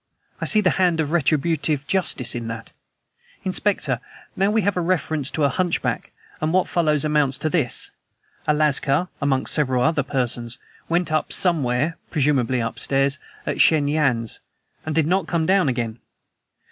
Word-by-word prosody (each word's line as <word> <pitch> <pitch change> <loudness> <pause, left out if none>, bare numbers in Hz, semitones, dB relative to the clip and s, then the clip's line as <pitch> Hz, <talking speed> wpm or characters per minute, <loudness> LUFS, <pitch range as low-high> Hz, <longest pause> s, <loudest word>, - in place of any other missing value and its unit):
I - - 0
see 215 - +4
the 185 - +3
hand 175 -3 +3
of 155 -2 0
retributive 155 -2 +1
justice 135 -8 0
in 120 -1 -4
that, 115 0 -7 0.7
Inspector. 185 - 0 0.4
Now 195 +1 +2
we 215 0 +2
have 200 +1 +1
a 180 - 0
reference 160 -5 0
to 155 - -2
a 140 - +4
hunchback, 180 +2 -1 0.3
and 155 +1 0
what 185 +1 +2
follows 155 -4 +1
amounts 150 -3 +2
to 155 - -2
this: 150 -9 -1 0.6
A 150 - +4
lascar 150 +3 +2
(amongst 135 -2 0
several 130 -5 +1
other 160 0 +2
persons) 125 -3 -2 0.3
went 170 -1 +1
up 155 -1 0
somewhere 155 -2 +1
presumably 130 -5 +1
upstairs 135 +4 0 0.3
at - - 0
Shen 150 -3 +4
Yan's, 135 -7 +1 0.5
and 155 - -2
did 160 -2 +3
not 185 +4 +1
come 165 -2 0
down 185 -4 +3
again. 120 -2 -3
150 Hz, 160 wpm, -22 LUFS, 135-170 Hz, 0.7 s, see